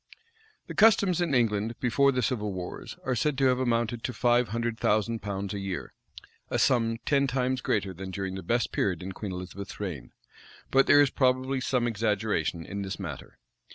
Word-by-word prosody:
The - - -7
customs 200 -5 +4
in 165 -6 +1
England, 115 -1 +1
before 140 +3 +3
the 125 -1 -1
civil 105 -6 -1
wars, 90 -1 -7
are 130 - +1
said 135 +4 0
to 135 - +2
have 130 -1 +3
amounted 120 -2 0
to 125 - -2
five 120 0 +3
hundred 115 +1 -2
thousand 110 +2 +1
pounds 100 -1 -4
a 100 - -3
year;[] 95 -2 -5 0.6
a - - 0
sum 115 -3 +2
ten 140 -1 +3
times 130 0 0
greater 100 -3 -1
than 95 +2 -7
during 95 0 -4
the 95 - -5
best 115 +6 0
period 90 -4 -1
in 95 - -5
Queen 100 +1 -6
Elizabeth's 90 +2 -7
reign: 90 -11 -5 0.6
but 135 0 +4
there 145 - +7
is 140 - 0
probably 130 0 +1
some 125 -2 +1
exaggeration 105 -7 -1
in 100 0 -5
this 95 0 -5
matter. 85 -8 -7
115 Hz, 190 wpm, -28 LUFS, 100-130 Hz, 0.6 s, there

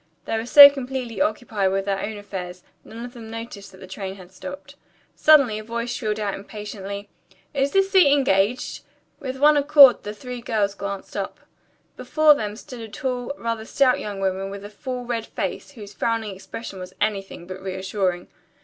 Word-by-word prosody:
They - - -2
were 225 +1 -3
so 285 +2 +12
completely 260 -5 -4
occupied 210 -3 0
with 195 0 -1
their 195 -1 -1
own 215 0 -4
affairs, 185 -3 -7 0.2
none 230 +2 -9
of 245 - -10
them 230 -3 -10
noticed 225 -3 -8
that 190 - -15
the 190 - -11
train 190 0 -6
had 185 -2 -14
stopped. 280 +9 -9 0.4
Suddenly 275 -9 +5
a - - -8
voice 235 +2 -4
shrilled 215 -3 -2
out 205 -2 -1
impatiently, 200 -1 -7 0.5
"Is 275 -1 +1
this 390 +2 +2
seat 365 -8 +6
engaged?" 250 -5 +1 0.4
With 265 -1 -5
one 295 +2 +5
accord 285 -2 +7
the 210 +1 -7
three 250 +1 -7
girls 215 -4 0
glanced 200 -1 -6
up. - - -4 0.6
Before 310 -1 +4
them 210 -7 -4
stood 245 +1 -10
a 225 - -8
tall, 250 +1 -3
rather 230 -1 -3
stout 255 +3 +2
young 205 -2 -5
woman 190 0 -1
with 200 0 -8
a 205 - -9
full, 250 +3 -6
red 235 -2 -3
face, - - -5
whose 205 -5 -11
frowning 225 -3 -1
expression 195 +1 -8
was 180 0 -9
anything 195 -4 -2
but 185 +1 -8
reassuring. 190 -1 -2
220 Hz, 185 wpm, -23 LUFS, 195-250 Hz, 0.6 s, so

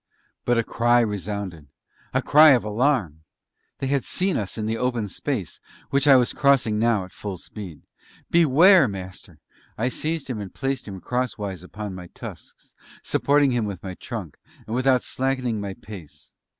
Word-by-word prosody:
But 120 -1 +2
a 115 - +2
cry 120 +2 +3
resounded 100 -6 -4 0.4
a - - 0
cry 155 0 +7
of 125 - +2
alarm. 105 - 0 0.6
They - - -4
had 135 0 0
seen 185 0 0
us 100 0 -3
in 110 - -2
the 110 +1 -1
open 120 -3 -1
space, 105 - -4 0.3
which 140 +1 +2
I 140 - +9
was 125 -2 +3
crossing 130 -7 +3
now 110 -4 +2
at 90 - -16
full 100 -3 -6
speed.... 90 -2 -10 0.5
"Beware, 170 +1 +6
Master!" 95 -3 -8 0.4
I 120 +3 0
seized 155 +3 -3
him 120 -5 -4
and 100 - -7
placed 135 -3 -2
him 95 -2 -7
cross 125 -2 -2
wise 95 -4 -5
upon 105 +2 -7
my 90 -1 -8
tusks, - - -11 0.3
supporting 145 -1 +2
him 120 -3 0
with 100 -5 -6
my 95 -1 -5
trunk, 100 - -7 0.3
and 110 - -4
without 130 0 +3
slackening 130 -4 -1
my 100 -1 -5
pace. 95 -8 -12
115 Hz, 170 wpm, -24 LUFS, 100-135 Hz, 0.6 s, I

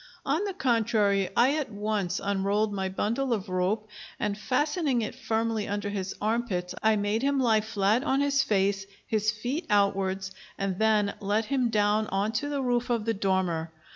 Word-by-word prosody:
On 300 +8 +1
the 395 -2 -4
contrary, 220 - +2
I 260 +5 +5
at 300 - -3
once 205 -3 -1
unrolled 200 +2 0
my 190 -1 -2
bundle 235 +7 -1
of 205 -3 -3
rope, 185 +4 0 0.3
and 205 - -1
fastening 275 - 0
it - - -4
firmly 225 -1 -1
under 205 0 -2
his 195 -2 -4
arm 230 +3 0
pits 180 -4 -3
I 220 0 +4
made 205 +2 0
him 280 0 +1
lie 225 -4 +3
flat 215 +2 +1
on 275 -2 +1
his 280 -1 +3
face, 195 -3 +1 0.2
his 215 -1 0
feet 245 +10 -3
outwards, 195 -2 +1 0.3
and 195 -2 -2
then 215 -2 +3
let 210 +2 0
him 255 -1 +1
down 210 0 +2
on 200 +2 0
to 290 +5 -2
the 280 -2 -1
roof 245 -1 0
of 230 -3 0
the 225 - +1
dormer. 185 -5 0
215 Hz, 180 wpm, -27 LUFS, 200-240 Hz, 0.3 s, I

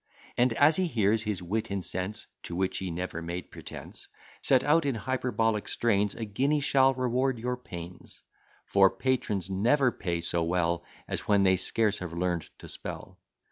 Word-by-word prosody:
And, 120 -1 +3
as 145 +6 +5
he 185 -1 +2
hears 110 -6 +2
his 105 -5 -3
wit 105 +5 -2
and 100 -3 -2
sense 95 +4 -3 0.2
(To 85 - -5
which 95 0 0
he 95 - -3
never 85 0 -4
made 85 0 -5
pretence) - - -9 0.3
Set 130 -2 +3
out 160 +3 +4
in 140 -3 0
hyperbolic 115 -3 0
strains, 105 -3 +1
A 115 - -4
guinea 135 +9 +1
shall 135 -1 +4
reward 130 +1 +1
your 125 +2 -2
pains; 90 -7 -10 0.4
For 95 -1 +5
patrons 105 -4 -1
never 125 +7 +3
pay 85 -5 -3
so 85 0 0
well, 85 0 0 0.2
As - - -4
when 100 -1 +4
they 95 -1 +5
scarce 105 +3 +1
have 90 -2 -6
learn'd 85 -1 -1
to - - -11
spell. - - -7
105 Hz, 175 wpm, -29 LUFS, 90-125 Hz, 0.4 s, as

